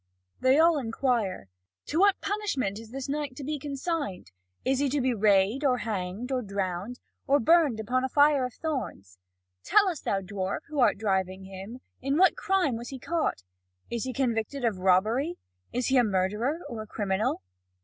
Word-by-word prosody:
They 260 +2 +4
all 325 -1 +5
inquire: 225 - -1 0.4
"To 315 - -1
what 400 0 +4
punishment 340 - -2
is 225 -1 -11
this 270 +3 -5
knight 285 -2 -3
to 280 - -7
be 295 +2 -3
consigned? 280 - -4 0.3
Is 265 0 +2
he 285 -1 +2
to 290 +2 0
be 255 -1 +1
rayed, 210 +4 +3
or 260 -3 +3
hanged, 210 +2 -4
or 255 -1 0
drowned, 200 +2 -3 0.3
or 280 +1 +4
burned 300 -4 +4
upon 250 +4 0
a 260 - -1
fire 290 -1 +4
of 250 -2 -4
thorns? 170 - -5 0.4
Tell 410 -1 +4
us, 345 -6 -2
thou 195 - 0
dwarf, 190 0 -3
who 300 -1 -3
art 245 - +4
driving 190 -2 -1
him, 195 +6 -9 0.2
in 275 +2 0
what 375 +2 +5
crime 370 -11 +1
was 235 +1 -7
he 270 - -6
caught? 315 - -2 0.5
Is 235 0 -2
he 260 - -2
convicted 245 0 -1
of 210 -5 0
robbery? 220 - +2 0.3
Is 250 0 -1
he 265 - +4
a 245 - +6
murderer, 210 - 0
or 230 -2 -6
a 215 - -9
criminal?" 205 - -1
250 Hz, 180 wpm, -28 LUFS, 200-285 Hz, 0.5 s, a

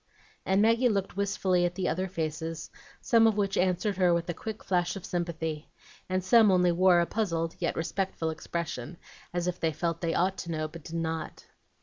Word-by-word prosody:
And 195 +2 +3
Maggie 230 +3 +4
looked 195 -4 -1
wistfully 195 -2 +1
at 175 0 0
the 185 -1 -1
other 185 +4 -1
faces, 165 -2 -4 0.3
some 225 -1 +5
of 215 -2 +1
which 195 -1 0
answered 185 +2 +1
her 180 -2 +4
with 170 0 -2
a - - 0
quick 220 +5 -7
flash 175 -1 0
of 195 - -7
sympathy, 165 -3 -3 0.4
and 185 0 0
some 220 +3 +6
only 180 -2 +4
wore 175 0 +5
a - - +2
puzzled 165 -6 -1
yet - - -1
respectful 165 -1 -2
expression, 165 -2 -5 0.3
as 175 0 -2
if 180 0 -2
they 160 - +1
felt 165 +1 -2
they 165 -1 0
ought 190 +2 +1
to 170 - -5
know, 155 -1 -2
but 160 0 -12
did 165 - -7
not. 165 -1 -4
175 Hz, 200 wpm, -29 LUFS, 165-195 Hz, 0.4 s, some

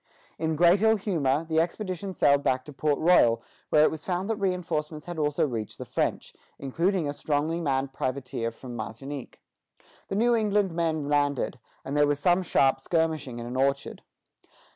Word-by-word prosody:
In 160 -1 0
great 175 +4 +5
ill 220 0 +5
humor, 165 -8 0
the 160 0 +2
expedition 185 +2 -3
sailed 140 -1 +4
back 130 -2 0
to 150 - -10
Port 145 +1 0
Royal, 120 -9 +4 0.3
where 150 - +5
it - - +4
was 160 -1 -7
found 185 +1 -2
that - - 0
reinforcements 165 -6 -2
had 175 -2 -6
also 150 0 +1
reached 115 -5 -5
the - - -7
French, - - -2 0.2
including 170 +5 0
a 145 - -2
strongly 155 +3 -1
manned 135 -3 -1
privateer 130 -3 -3
from 120 +1 -10
Martinique. 125 +5 -7 0.7
The - - -3
New 240 +3 +3
England 210 -4 +2
men 160 -3 -1
landed, 145 -3 0 0.3
and 140 - -4
there 145 0 +4
was 145 0 0
some 175 +4 +3
sharp 135 -7 +2
skirmishing 155 -4 -1
in 120 - -6
an 120 +1 -6
orchard. 135 +1 0
150 Hz, 175 wpm, -27 LUFS, 135-175 Hz, 0.7 s, great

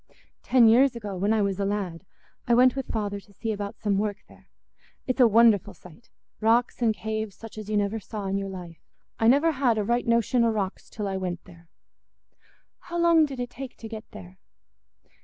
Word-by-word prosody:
"Ten 245 -3 +5
years 250 +3 +5
ago, 210 -4 -6
when 200 +4 0
I 220 -2 +2
was 200 -1 -2
a - - 0
lad, 195 -3 -3 0.4
I 240 - +4
went 255 +1 +5
with 270 -1 -4
father 205 -2 -3
to 200 - -21
see 225 +3 -4
about 205 -1 -5
some 200 -2 0
work 210 -1 -2
there. - - -20 0.6
It's 255 +1 -2
a 245 - +7
wonderful 225 -3 +4
sight—rocks 225 +6 -2
and 225 -2 +2
caves 215 +1 -4
such 225 +1 -11
as 215 -1 -8
you 215 - +1
never 205 +2 0
saw 210 0 -7
in 195 +1 -1
your 195 0 -4
life. 175 -3 -9 0.4
I 225 - +3
never 285 +7 +4
had 260 -6 +1
a 210 - +1
right 235 +3 0
notion 235 +1 +2
o' 230 - +3
rocks 205 -3 -3
till 210 -2 -5
I 195 -1 -2
went 180 -2 -4
there." 170 -2 -17 1.1
"How 345 -1 -6
long 335 -2 +4
did 270 -3 -8
it 245 0 -4
take 265 0 -9
to 225 - -9
get 220 0 -9
there?" 95 0 -12
215 Hz, 205 wpm, -26 LUFS, 200-240 Hz, 1.1 s, a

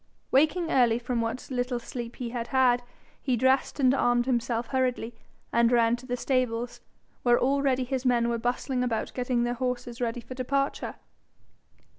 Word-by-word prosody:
Waking 320 +5 +3
early 240 -3 +4
from 245 -1 -2
what 230 +4 -4
little 250 0 -1
sleep 240 0 -6
he 240 -2 -5
had 235 -1 -3
had, 255 -2 +3 0.4
he 255 -3 0
dressed 260 +4 +2
and 260 -2 +5
armed 245 -2 +2
himself 240 -2 -1
hurriedly, 255 -3 -1 0.4
and 235 0 +4
ran 235 -1 +4
to 255 +1 -13
the 245 -1 -2
stables, 245 -2 -1 0.4
where 240 -1 +4
already 270 -1 +2
his 255 0 -2
men 240 -2 +2
were 235 -1 -1
bustling 250 +2 -1
about 230 -3 -2
getting 245 -1 0
their 240 0 0
horses 250 -1 -3
ready 235 0 -1
for 255 - -9
departure. 275 +2 -1
245 Hz, 165 wpm, -27 LUFS, 235-260 Hz, 0.4 s, and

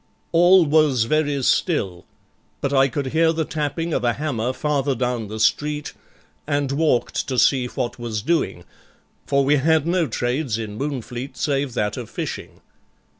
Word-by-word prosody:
All 175 +1 +6
was 150 -5 +3
very 145 +2 0
still, 95 - 0 0.5
but 140 - -2
I 135 0 +5
could 135 +1 -4
hear 160 0 +4
the 160 -1 -1
tapping 160 +2 -3
of - - 0
a 120 -1 +2
hammer 130 -5 -2
farther 140 0 -1
down 125 -2 -2
the 110 +2 -6
street, 150 +6 0 0.5
and 145 -2 0
walked 145 -4 0
to 130 -2 -2
see 125 0 +3
what 120 0 -4
was 110 -3 -4
doing, 170 +4 0 0.6
for 140 -1 +2
we 145 +2 +4
had 155 +2 +2
no 170 -1 +1
trades 120 0 -1
in 110 -2 -5
Moonfleet 135 -2 -5
save 140 -3 -1
that 105 +3 -1
of 120 -3 -6
fishing. 110 - -6
140 Hz, 160 wpm, -22 LUFS, 120-155 Hz, 0.6 s, All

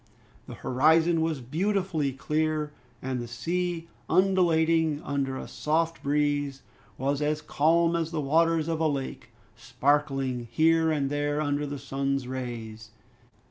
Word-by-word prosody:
The - - -8
horizon 160 +5 +3
was 160 -4 -1
beautifully 170 - 0
clear, 150 +2 -1 0.3
and 130 -1 -2
the 120 - -6
sea, 170 +7 -2 0.2
undulating 165 -5 +3
under 135 -2 -2
a - - -6
soft 165 +2 -1
breeze, 145 -1 0 0.3
was 140 +2 -1
as 150 +1 0
calm 165 +3 +2
as 165 -1 -1
the 165 -2 -3
waters 160 +2 +2
of 165 -1 -1
a 160 - +2
lake, 140 -3 -4 0.3
sparkling 135 -4 0
here 160 +5 +3
and 145 -3 0
there 145 0 0
under 145 -1 -1
the 145 0 -4
sun's 135 -1 -2
rays. 115 -4 -6
150 Hz, 135 wpm, -27 LUFS, 135-165 Hz, 0.3 s, horizon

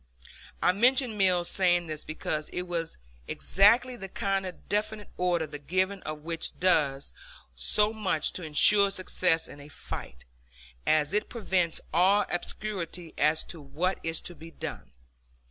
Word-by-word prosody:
I - - +5
mention 245 +3 +3
Mills 180 -3 +3
saying 175 -2 +2
this 155 -2 -5
because 155 -1 -4
it 180 - -3
was 170 -2 -4 0.3
exactly 235 +6 +3
the 195 -4 -8
kind 195 0 -1
of 180 - -11
definite 210 0 -2
order 175 -2 0
the 145 -1 -9
giving 185 +6 -1
of 155 0 -6
which 165 +1 -2
does 145 -7 +1 0.4
so 210 - +3
much 190 -8 -1
to - - -2
insure 200 +6 +5
success 185 -3 +1
in 145 - -12
a 145 - -12
fight, - - -9 0.6
as 155 +2 +2
it 210 +1 0
prevents 185 -7 -1
all 195 +4 +4
obscurity 175 -3 -4
as 155 +2 +2
to 165 - -7
what 160 +7 -2
is 165 0 0
to 175 - -3
be 165 0 -12
done. 65 - -8
180 Hz, 150 wpm, -28 LUFS, 155-195 Hz, 0.6 s, I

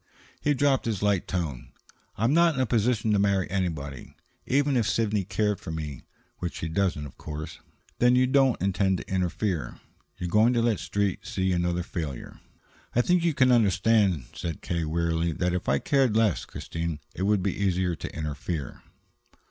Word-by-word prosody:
He 145 -1 +2
dropped 135 0 +2
his 105 -4 -2
light 100 -3 +1
tone. 80 -9 -4 0.4
"I'm 115 +6 +2
not 170 -1 +4
in - - -2
a - - +3
position 115 -1 +1
to 100 - +3
marry 100 -2 +2
anybody. 80 -9 -3 0.3
Even 140 +1 +2
if 115 -4 +2
Sidney 105 -3 +1
cared 105 +2 0
for - - -9
me, 75 -4 -6 0.3
which 90 -1 -4
she 80 - -4
doesn't, 85 -4 0
of 70 - -12
course 75 0 -7 0.2
" - - -35
"Then 125 +1 +5
you 130 0 +4
don't 135 -1 +3
intend 95 0 +1
to - - -8
interfere? 90 -2 -2 0.4
You're 90 - -3
going 110 +7 +4
to 120 - +2
let 115 -3 +2
the - - -7
Street 95 +2 -1
see 95 -1 0
another 90 0 0
failure?" 80 -8 -6 0.6
"I 120 - +5
think 175 +5 +2
you 165 -4 +1
can 130 -2 +4
understand," 100 - +3
said 85 -3 -5
K. 85 - -2
rather 80 -2 -1
wearily, 85 0 0
"that 90 +2 -1
if 90 - -2
I 70 - +3
cared 130 - +2
less, 110 -6 +2
Christine, 80 -2 -5
it - - -7
would 100 -1 +2
be 95 -2 0
easier 95 -2 0
to 70 - -6
interfere." 75 -1 -4
95 Hz, 190 wpm, -27 LUFS, 85-115 Hz, 0.6 s, Then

